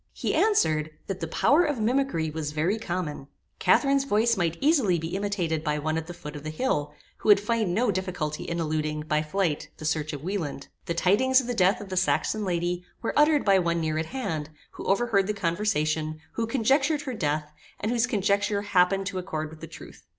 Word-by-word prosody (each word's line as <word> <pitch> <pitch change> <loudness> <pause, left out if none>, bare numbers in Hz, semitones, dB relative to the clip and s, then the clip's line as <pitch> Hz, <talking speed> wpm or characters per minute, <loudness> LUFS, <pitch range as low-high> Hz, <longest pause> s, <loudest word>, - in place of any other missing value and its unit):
He - - -2
answered, 155 - +2 0.2
that 195 -1 -4
the 165 - -3
power 290 - +3
of 295 -5 -1
mimickry 225 - 0
was 150 -2 -3
very 170 +8 0
common. 175 -8 -4 0.3
Catharine's 275 -1 +3
voice 230 -2 +2
might 170 -3 -1
easily 270 - +3
be 165 +2 -4
imitated 185 -6 -1
by 150 -2 0
one 155 +1 -1
at 160 0 -3
the 175 - -6
foot 150 -3 -9
of 145 - -7
the 155 - -5
hill, 150 - -1 0.2
who - - -3
would 205 - +8
find 210 -3 0
no 235 0 +2
difficulty 175 -4 -3
in 170 -1 -3
eluding, 155 -1 -1
by 150 0 0
flight, 155 0 -1
the 155 - -8
search 155 -1 0
of 145 -2 -7
Wieland. 165 -7 -4 0.2
The 170 - -1
tidings 255 +10 +4
of 260 - -3
the 245 - -2
death 195 -1 +3
of 200 - -9
the 185 - -3
Saxon 210 +3 +1
lady 175 -1 -1 0.2
were - - -1
uttered 300 0 +4
by 195 -2 +5
one 170 -1 0
near 155 -1 -1
at 160 - -2
hand, 160 - -3 0.2
who - - -9
overheard 200 -1 +2
the 210 - -1
conversation, 155 -5 -1
who 230 -1 -2
conjectured 275 +5 +2
her 260 - -4
death, 150 -6 -2 0.3
and 215 - -1
whose 240 0 +2
conjecture 205 -2 +1
happened 195 0 +2
to 190 -1 -3
accord 155 -4 -4
with 160 - -13
the 165 - -7
truth. 160 - -12
180 Hz, 210 wpm, -26 LUFS, 155-220 Hz, 0.3 s, would